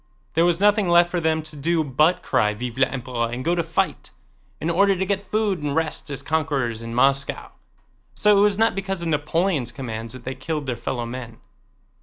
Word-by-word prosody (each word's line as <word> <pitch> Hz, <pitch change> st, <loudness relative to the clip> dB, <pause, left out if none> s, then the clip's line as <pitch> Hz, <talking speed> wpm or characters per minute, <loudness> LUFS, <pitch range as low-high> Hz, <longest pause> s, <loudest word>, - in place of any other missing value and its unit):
There 165 Hz, +2 st, +3 dB
was 175 Hz, -1 st, +2 dB
nothing 205 Hz, -1 st, +3 dB
left 175 Hz, 0 st, +5 dB
for 175 Hz, -, -1 dB
them 160 Hz, -1 st, +1 dB
to 155 Hz, 0 st, -11 dB
do 160 Hz, +3 st, +1 dB
but 150 Hz, +5 st, +2 dB
cry 105 Hz, 0 st, +1 dB
"Vive 120 Hz, +2 st, -5 dB
l'Empereur!" 125 Hz, -3 st, -1 dB
and 125 Hz, +2 st, -5 dB
go 170 Hz, -, +2 dB
to 175 Hz, -, +1 dB
fight, 165 Hz, 0 st, -2 dB, 0.5 s
in 160 Hz, +3 st, -1 dB
order 195 Hz, +3 st, +4 dB
to 190 Hz, +1 st, -1 dB
get 200 Hz, 0 st, -2 dB
food 210 Hz, -4 st, 0 dB
and 145 Hz, -1 st, -2 dB
rest 160 Hz, -2 st, -1 dB
as 140 Hz, -1 st, -4 dB
conquerors 140 Hz, -7 st, -1 dB
in 115 Hz, 0 st, -6 dB
Moscow. 135 Hz, +2 st, +1 dB, 0.6 s
So 210 Hz, 0 st, +4 dB
it 200 Hz, -, +5 dB
was 205 Hz, -1 st, +3 dB
not 225 Hz, +1 st, +3 dB
because 195 Hz, -2 st, -3 dB
of 170 Hz, -, -2 dB
Napoleon's 150 Hz, -3 st, 0 dB
commands 115 Hz, -2 st, -6 dB
that 130 Hz, -2 st, -10 dB
they 130 Hz, -, -4 dB
killed 145 Hz, +3 st, -4 dB
their 125 Hz, -2 st, -2 dB
fellow 120 Hz, +1 st, -3 dB
men. 120 Hz, -1 st, -7 dB
155 Hz, 205 wpm, -23 LUFS, 130-175 Hz, 0.6 s, left